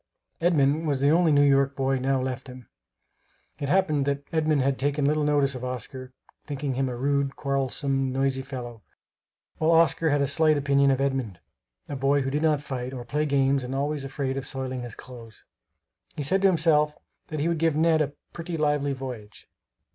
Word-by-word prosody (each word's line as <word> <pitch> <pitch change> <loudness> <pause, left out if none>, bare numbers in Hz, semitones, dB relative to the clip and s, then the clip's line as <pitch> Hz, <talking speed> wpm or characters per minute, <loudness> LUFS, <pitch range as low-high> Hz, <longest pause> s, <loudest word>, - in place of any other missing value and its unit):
Edmund 155 -2 +2
was 140 -3 0
the 140 +2 +3
only 170 0 +4
New 145 -1 +5
York 140 0 +3
boy 135 0 0
now 135 +1 +1
left 130 +1 -4
him. 125 -1 -11 0.9
It 140 -2 -3
happened 155 -6 +2
that 140 0 -1
Edmund 155 -3 +2
had 135 0 0
taken 145 +1 0
little 150 +1 +2
notice 145 -2 +2
of 125 -1 -7
Oscar, 130 +1 -6 0.3
thinking 145 -2 -3
him 135 0 -1
a 125 - -4
rude, 140 +2 0
quarrelsome, 135 -1 -1
noisy 135 0 0
fellow; 125 -4 -8 0.8
while 160 - +2
Oscar 165 -1 +3
had 145 -1 +2
a - - +2
slight 155 +2 +2
opinion 140 0 +3
of 135 -1 +2
Edmund 130 -9 -2 0.5
a 145 - -5
boy 135 +1 +2
who 135 - -2
did 150 +2 -1
not 155 -3 +2
fight, 130 -3 -5
or 125 -2 -7
play 150 +3 -1
games, 135 -1 +2
and 125 +2 -4
always 145 +1 -2
afraid 135 0 -3
of 135 0 -4
soiling 130 -2 -4
his 120 -3 -7
clothes. 115 -3 -12 0.7
He 145 - -3
said 185 +8 +1
to 195 - +5
himself 155 -4 +2 0.3
that 155 - -5
he 150 - 0
would 170 -2 0
"give 165 -2 +2
Ned 160 0 +3
a 145 -1 -1 0.2
pretty 165 0 -5
lively 145 -2 +1
voyage." 125 -6 -8
140 Hz, 190 wpm, -26 LUFS, 130-150 Hz, 0.9 s, New